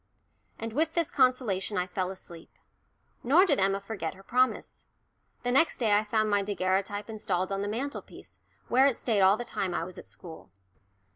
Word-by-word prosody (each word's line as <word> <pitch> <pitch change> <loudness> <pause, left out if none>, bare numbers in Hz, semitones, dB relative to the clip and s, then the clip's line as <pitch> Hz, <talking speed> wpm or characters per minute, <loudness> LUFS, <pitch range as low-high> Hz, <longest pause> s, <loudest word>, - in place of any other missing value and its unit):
And 225 0 -5
with 320 +4 0
this 335 -3 0
consolation 240 -8 +1
I 180 - +1
fell 185 0 -3
asleep. 175 -3 -10 0.7
Nor 315 +10 +5
did 295 -7 +2
Emma 195 +1 +2
forget 195 -4 -5
her 195 - -15
promise. 255 +5 0 0.6
The 245 - 0
next 275 +6 +3
day 225 -4 +1
I 210 - +3
found 215 0 +1
my 205 -1 +2
daguerreotype 200 +1 -1
installed 195 -4 -2
on 195 0 -1
the 205 - -2
mantelpiece, 255 +8 -6 0.3
where 260 +3 +5
it 265 - 0
stayed 220 -5 +1
all 190 +2 +5
the 240 - -5
time 185 -6 -3
I - - -1
was 185 0 -9
at - - -12
school. 160 - -11
205 Hz, 185 wpm, -28 LUFS, 190-250 Hz, 0.7 s, Nor